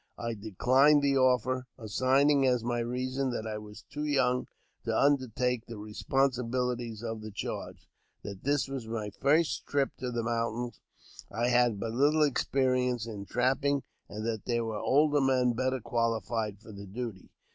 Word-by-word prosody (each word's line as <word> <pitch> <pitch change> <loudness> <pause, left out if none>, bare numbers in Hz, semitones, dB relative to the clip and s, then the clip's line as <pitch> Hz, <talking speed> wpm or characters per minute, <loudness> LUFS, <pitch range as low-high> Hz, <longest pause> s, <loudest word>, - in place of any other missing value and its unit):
I 115 0 -3
declined 130 +8 +3
the 140 -1 +3
offer, 130 -1 +2
assigning 135 +5 +3
as 125 -3 +2
my 120 0 -1
reason 130 +3 -1
that 120 -3 -3
I 110 -1 -4
was 105 0 -11
too 150 - -6
young 130 -4 +1 0.4
to - - 0
undertake 125 -4 +1
the 115 - -7
responsibilities 120 +1 -1
of 115 -1 -4
the 110 - -7
charge; 105 - -6 0.4
that 100 -2 -8
this 145 0 +1
was 135 -4 -5
my 110 -2 -4
first 155 +7 +1
trip 140 -1 +1
to 125 - -3
the 120 -1 -2
mountains, 120 +1 -2 0.5
and 115 - -5
I 120 - +3
had 120 -4 +3
but 115 +2 -3
little 145 +6 +3
ex 145 -4 +2
perience 125 -3 +1
in 105 -3 -6
trapping, 135 +2 +1 0.3
and 105 +2 -5
that 110 -3 -3
there 120 -1 0
were 110 -2 -3
older 145 +1 +3
men 130 -2 +3
better 130 +2 0
qualified 115 -2 -1
for 110 - -13
the 100 -1 -9
duty. 110 -1 -6
125 Hz, 170 wpm, -30 LUFS, 115-135 Hz, 0.5 s, declined